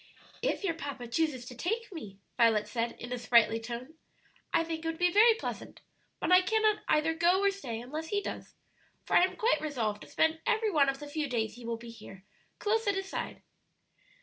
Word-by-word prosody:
"If - - -1
your 390 - +1
papa 280 -6 -6
chooses 260 -1 -1
to 250 - -9
take 445 - -3
me," 210 - -8 0.2
Violet 225 -3 +3
said, 230 +2 -2
in 245 +1 -7
a 250 - -3
sprightly 230 -2 +4
tone. 240 +5 -7 0.6
"I - - +3
think 325 -1 -5
it - - -3
would 325 0 -2
be 355 +1 +3
very 445 +4 +6
pleasant, 455 - -6 0.4
but - - -1
I 365 0 +8
cannot 430 +2 +2
either 310 +1 +2
go 345 +3 +3
or 400 - +4
stay 255 - -6
unless 300 +7 -6
he 405 +4 0
does; - - -7 0.5
for - - 0
I - - +7
am 370 - +1
quite 460 +3 +2
resolved 230 -9 -2
to - - -11
spend 320 0 +2
every 440 -2 +2
one 285 -5 +4
of 270 - -2
the 295 - -8
few 295 -1 -3
days 225 -3 -1
he 240 0 -11
will 230 -1 -2
be 230 0 -10
here, 205 -4 -12 0.3
close 440 +1 0
at 400 - +2
his 390 0 -3
side." - - -5
305 Hz, 215 wpm, -30 LUFS, 235-370 Hz, 0.6 s, I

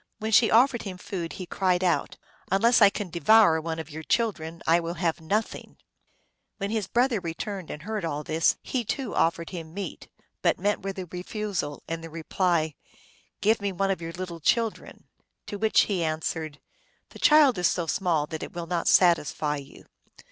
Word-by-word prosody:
When 220 +1 -4
she 220 +1 +6
offered 240 +1 +4
him 190 -3 -6
food 180 -3 -5
he 185 - -6
cried 185 0 0
out, 175 -2 0 0.2
" - - -30
Unless 230 +5 +4
I 205 - +9
can 200 -3 -5
devour 170 0 +5
one 160 0 -4
of 160 -1 -7
your 160 +2 -6
chil 230 +7 +1
dren 165 -2 -9
I 165 +1 +4
will 170 0 -4
have 165 -2 -1
nothing! 210 +7 -3 0.4
" - - -47
When 200 -1 -3
his 220 -3 -1
brother 245 -2 +2
returned 180 +2 -5
and 150 - -7
heard 215 +1 -4
all 150 -2 -3
this, 160 +2 +2
he, 255 -3 -2
too, 250 +1 -3
offered 165 0 0
him 165 -2 -8
meat, 195 -4 -6 0.3
but - - +2
met 205 +3 0
with 195 0 -5
a 185 - -4
refusal 180 -3 -4
and 165 0 -4
the 165 - -7
reply, 165 0 0 0.4
" - - -34
Give 220 +1 +2
me 200 -1 -1
one 195 +1 0
of 190 - -3
your 165 0 -6
little 175 -1 -6
children." 225 +7 -1 0.4
To 205 - -6
which 220 +1 +4
he 190 -5 0
answered, 155 -1 -3 0.3
" - - -41
The - - -12
child 295 -8 +5
is 180 - +4
so 175 - -1
small 165 -3 0
that 160 +1 -6
it - - -7
will 170 -1 -5
not 170 0 -2
satisfy 155 -4 +3
you. 140 -1 -12
180 Hz, 200 wpm, -26 LUFS, 165-205 Hz, 0.4 s, I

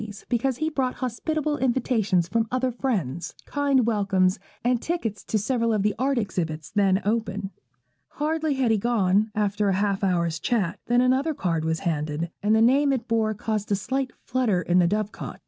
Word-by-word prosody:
's, 205 0 -11
because 245 +1 0
he 315 - -1
brought 270 -5 -1
hospitable 295 +4 -2
invitations 230 -8 +1
from 225 +3 0
other 255 0 0
friends, 195 - -2
kind 280 -4 +2
welcomes, 195 -3 +2 0.2
and 245 0 +1
tickets 240 - -3
to 220 - -1
several 230 +2 0
of 210 -3 +1
the 210 0 +2
art 270 +1 +1
exhibitions 165 -8 -3
then 195 -2 +3
open. 210 -2 -1 0.6
Hardly 310 0 -1
had 260 -4 +2
he 220 - +2
gone, 210 -2 +2
after 205 -1 +1
a 190 - +2
half 200 0 0
hour's 170 -3 +1
chat, 205 -8 -1
than 245 +1 +4
another 265 +5 +2
card 165 -7 -1
was 160 0 -1
handed, 155 -1 -2
and 210 +2 +3
the 220 - +4
name 275 +4 +4
it 245 -3 -2
bore 220 -2 +1
caused 210 0 -3
a - - +4
slight 260 +6 -2
flutter 235 -8 0
in 175 +1 +3
the 175 - +4
dove 210 +2 -1
cot. - - -8
220 Hz, 185 wpm, -25 LUFS, 195-255 Hz, 0.6 s, than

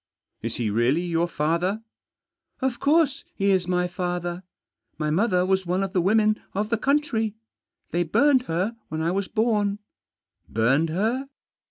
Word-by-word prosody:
" - - -56
Is 115 0 -3
he 115 -4 -1
really 120 +10 +2
your 170 -1 0
father? 170 +7 -1 0.4
" - - -56
"Of 260 -3 -1
course 290 -1 +2
he 200 0 +2
is 185 -2 +2
my 180 0 +1
father. 175 0 -3 0.6
My 150 -1 -1
mother 180 +1 +2
was 190 -1 +1
one 185 +2 +1
of 195 0 -4
the 185 - +2
women 215 +3 +3
of 210 +2 -1
the 230 - +3
country. 240 -6 +1 0.6
They 175 - +1
burned 260 - +3
her 185 +8 -1
when 160 +1 -3
I 165 - +1
was 195 +1 -1
born." 210 -3 +1 0.4
" - - -42
Burned 135 +9 +2
her 225 - -1
185 Hz, 170 wpm, -25 LUFS, 170-220 Hz, 0.6 s, women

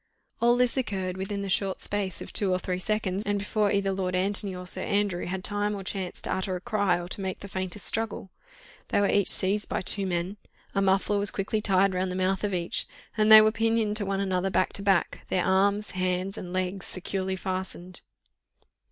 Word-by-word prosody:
All 240 +1 +4
this 250 +1 +2
occurred 190 -7 -2
within 200 +1 -4
the - - -4
short 195 0 0
space 200 -3 -1
of - - -8
two 200 -3 +3
or 185 - +2
three 185 0 -3
seconds, 200 -1 -1
and 205 0 0
before 205 +1 0
either 200 -1 +1
Lord 185 -1 -2
Antony 195 +1 +1
or 180 0 -7
Sir 180 - 0
Andrew 200 -4 0
had 185 +1 -4
time 205 +1 0
or 195 - -6
chance 190 -1 -5
to - - -1
utter 190 0 -2
a - - -4
cry 200 -5 +1
or 175 - -6
to 200 - -5
make 190 -1 -4
the 200 - -7
faintest 190 +1 -4
struggle. 220 -4 -1 0.6
They - - +1
were 200 - +3
each 200 - +3
seized 200 +2 +2
by - - -1
two 195 +1 +3
men, 180 +3 -2 0.4
a 195 - +1
muffler 195 +1 +2
was 200 0 +2
quickly 210 +2 -2
tied 195 -1 +3
round 185 0 -1
the - - -4
mouth 185 +1 0
of 205 - 0
each, 175 -2 -1 0.3
and 215 -1 +3
they 215 0 +12
were 215 0 +4
pinioned 225 -1 +1
to 205 - -1
one 195 0 -1
another 190 -1 0
back 185 - +1
to - - -3
back, 195 -3 +1
their 180 - +1
arms, 200 +2 +2
hands, 185 +1 -1
and 180 -5 -7
legs 185 +1 -2
securely 190 0 -2
fastened. 185 -1 -5
195 Hz, 215 wpm, -27 LUFS, 185-205 Hz, 0.6 s, they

